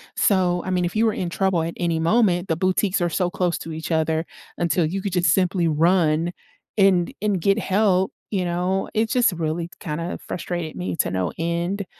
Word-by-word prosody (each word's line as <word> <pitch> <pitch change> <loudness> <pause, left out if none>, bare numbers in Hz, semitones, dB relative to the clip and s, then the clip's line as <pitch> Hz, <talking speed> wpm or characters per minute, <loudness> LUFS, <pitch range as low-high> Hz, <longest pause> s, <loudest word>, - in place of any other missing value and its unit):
so, 180 -3 +2
I 185 - -2
mean, 180 -1 +1
if 175 - -4
you 225 +1 +3
were 220 - +2
in 175 -2 -3
trouble 190 -2 +1
at 165 +1 -3
any 170 -2 0
moment, 180 0 +2
the 160 - +1
boutiques 185 +2 +1
are 175 -1 +1
so 180 +2 0
close 175 -2 -1
to 165 - -7
each 160 +2 -5
other 160 0 +1 0.3
until 170 -1 +1
you 190 +4 -3
could 195 -3 -3
just 175 -3 +2
simply 180 -2 +1
run 165 +1 +2 0.5
and 185 -3 +4
and 205 -3 +1
get 200 +4 +2
help, 190 -2 +2 0.2
you 190 -3 0
know, 180 +2 -1
it 220 0 +1
just 245 -5 +3
really 165 +1 -2
kinda 165 0 -4
frustrated 175 -3 -4
me 90 -1 -3
to - - 0
no 95 -2 -1
end, 170 +4 -2
175 Hz, 200 wpm, -23 LUFS, 165-190 Hz, 0.5 s, and